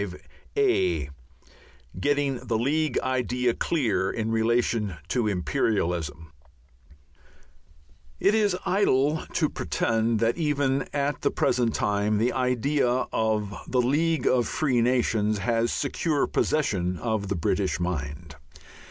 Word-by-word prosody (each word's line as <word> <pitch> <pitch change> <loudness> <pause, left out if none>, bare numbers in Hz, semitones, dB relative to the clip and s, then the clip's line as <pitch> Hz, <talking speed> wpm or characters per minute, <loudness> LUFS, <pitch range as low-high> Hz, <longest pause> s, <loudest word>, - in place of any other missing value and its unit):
V 90 - +1 0.9
GETTING 140 +2 0
THE 115 - +1
LEAGUE 150 +6 0
IDEA 125 -1 0
CLEAR 115 - 0
IN 110 0 -2
RELATION 115 -3 +1
TO 120 -4 0
IMPERIALISM 85 -3 0
§ - - -16
1 80 - -13 1.9
It 200 - +3
is 205 -4 +2
idle 155 -6 +2
to - - +2
pretend 115 0 0
that 115 +5 +1
even 140 -4 0
at 145 0 -1
the 140 - +2
present 120 -3 +1
time 105 +1 +1
the 115 +4 +1
idea 130 +1 +1 0.2
of 110 -2 0
the 125 - 0
League 155 +6 +1
of 125 -2 +3
Free 130 -6 +1
Nations 115 -3 +1
has 115 +2 0
secure 145 +1 0
possession 95 -12 0
of 110 -2 -2
the 100 - -1
British 95 +3 0
mind. 75 -3 -4
120 Hz, 120 wpm, -26 LUFS, 105-140 Hz, 1.9 s, It